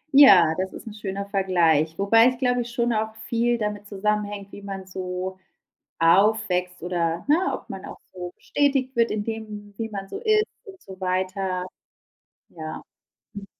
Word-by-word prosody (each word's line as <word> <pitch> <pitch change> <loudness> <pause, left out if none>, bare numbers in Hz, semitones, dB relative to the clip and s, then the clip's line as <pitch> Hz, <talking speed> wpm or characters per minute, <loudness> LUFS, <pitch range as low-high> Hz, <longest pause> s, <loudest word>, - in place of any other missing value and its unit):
Ja, 190 - +8
das 190 0 -2
ist - - -10
'n 220 - -6
schöner 200 -1 -4
Vergleich. 170 -6 +2
Wobei 225 +4 +5
ich 255 -1 0
glaube 245 -1 +1
ich, 240 - -5
schon 240 0 0
auch 220 0 -1
viel 240 +1 +1
damit 210 -2 -3
zusammenhängt, 205 0 -2
wie - - -10
man 195 -1 -6
so 185 0 -5 0.6
aufwächst 180 0 +3
oder, 170 -1 -1
ne, 300 - +6 0.2
ob - - -8
man - - -7
auch - - -9
so 180 -1 -7
bestätigt 275 -3 0
wird 230 0 +3
in 210 - -1
dem, 210 -2 -6
wie 225 - -2
man 195 -2 -6
so - - -6
ist 430 -2 +3 0.2
und 385 -4 -13
so 190 0 -12
weiter. 185 0 -1 0.8
Ja. 155 -2 -7 0.5
Mhm. 200 0 -7
200 Hz, 170 wpm, -24 LUFS, 185-225 Hz, 0.8 s, Ja